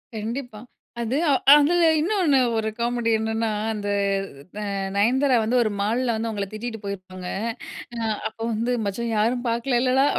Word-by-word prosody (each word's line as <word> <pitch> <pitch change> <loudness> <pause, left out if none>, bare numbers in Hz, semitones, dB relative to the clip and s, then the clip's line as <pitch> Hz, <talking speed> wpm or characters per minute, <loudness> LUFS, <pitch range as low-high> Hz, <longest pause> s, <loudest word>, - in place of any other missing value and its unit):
கண்டிப்பா. 225 +1 -5 0.4
அது 235 +4 -1 0.4
அதில 295 +3 +5 0.3
இன்னொன்னு 335 -4 +2 0.2
ஒரு 220 0 0
காமெடி 235 0 0
என்னன்னா, 220 +1 -1 0.2
அந்த 205 -1 -4 0.7
அ - - -3 0.3
நயன்தாரா 255 +6 +3
வந்து 235 +3 +1
ஒரு 215 - -1
மால்ல 235 +4 +1
வந்து 225 +1 -2
அவுங்கள 205 -2 -2
திட்டிட்டு 225 +1 -5
போயிருப்பாங்க. 185 -2 -6 0.7
அ - - -5 0.3
அப்போ 220 +1 -12
வந்து 230 +3 -1
"மச்சான் 225 +4 -2
யாரும் 240 +4 +1
பார்க்கலலேடா?" 255 +2 +2
230 Hz, 135 wpm, -24 LUFS, 215-255 Hz, 0.7 s, அதில